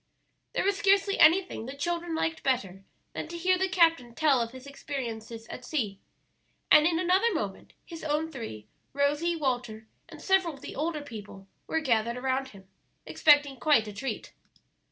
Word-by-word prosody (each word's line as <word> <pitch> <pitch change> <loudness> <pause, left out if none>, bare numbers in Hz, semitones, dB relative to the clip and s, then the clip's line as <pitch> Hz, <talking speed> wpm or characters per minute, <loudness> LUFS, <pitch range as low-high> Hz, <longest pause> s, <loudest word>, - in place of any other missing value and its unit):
There - - 0
was 400 +1 +1
scarcely 395 0 +3
anything 330 -7 +4
the 270 - -7
children 340 +2 -2
liked 325 0 -1
better 195 -8 -1 0.3
than - - -5
to 340 - -7
hear 365 +2 +2
the 380 0 +1
captain 330 -10 +2
tell 285 -4 +3
of 230 - -2
his 260 +1 -11
experiences 235 -5 -6
at 250 - -8
sea, 225 -8 -2 0.7
and 305 +1 +7
in 335 -1 +1
another 370 +6 +3
moment 200 -9 -5
his 330 -2 -9
own 310 +1 -1
three. 220 - -7 0.3
Rosie, 290 +5 +1
Walter, 245 -7 -2 0.2
and - - -11
several 380 -5 +1
of 275 - -16
the - - -8
older 305 0 -2
people 205 -6 -10 0.2
were 320 - 0
gathered 235 -4 +1
around 265 +1 -1
him, 195 -6 -15 0.4
expecting 290 -3 +4
quite 285 -9 +3
a 210 - -7
treat. 265 +7 -5
285 Hz, 170 wpm, -28 LUFS, 235-335 Hz, 0.7 s, and